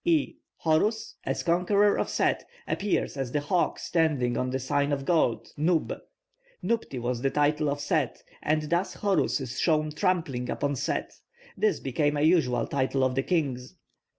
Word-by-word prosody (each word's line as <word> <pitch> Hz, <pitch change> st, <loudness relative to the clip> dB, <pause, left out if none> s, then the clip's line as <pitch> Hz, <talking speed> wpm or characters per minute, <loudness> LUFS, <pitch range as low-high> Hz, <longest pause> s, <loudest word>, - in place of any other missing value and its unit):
(E) 325 Hz, -4 st, +2 dB, 0.3 s
Horus, 185 Hz, +8 st, +1 dB
as -, -, -1 dB
conqueror 200 Hz, +4 st, +3 dB
of -, -, -1 dB
Set, -, -, +1 dB, 0.2 s
appears 200 Hz, -6 st, -1 dB
as 135 Hz, -3 st, -3 dB
the 150 Hz, -, +2 dB
hawk 170 Hz, +5 st, 0 dB
standing 145 Hz, -8 st, +1 dB
on 125 Hz, -, -1 dB
the 130 Hz, -, -1 dB
sign 140 Hz, +2 st, 0 dB
of 140 Hz, -1 st, -1 dB
gold, 160 Hz, -9 st, +1 dB
nub; 160 Hz, +2 st, +1 dB, 0.7 s
nubti 225 Hz, -, -1 dB
was 120 Hz, 0 st, -2 dB
the 135 Hz, -, +2 dB
title 150 Hz, +1 st, +1 dB
of 145 Hz, 0 st, -2 dB
Set, 145 Hz, -3 st, -1 dB, 0.2 s
and 155 Hz, +1 st, +1 dB
thus 170 Hz, +5 st, -1 dB
Horus 200 Hz, -6 st, +1 dB
is 130 Hz, -1 st, -5 dB
shown 155 Hz, -2 st, +2 dB
trampling 155 Hz, -8 st, -1 dB
upon 145 Hz, 0 st, -1 dB
Set; -, -, -2 dB, 0.4 s
this 430 Hz, -2 st, +1 dB
became 145 Hz, +3 st, 0 dB
a -, -, 0 dB
usual 140 Hz, -8 st, +3 dB
title 135 Hz, -1 st, 0 dB
of 130 Hz, -1 st, +2 dB
the 135 Hz, -, +1 dB
kings. 135 Hz, -6 st, -1 dB
150 Hz, 165 wpm, -27 LUFS, 130-170 Hz, 0.7 s, conqueror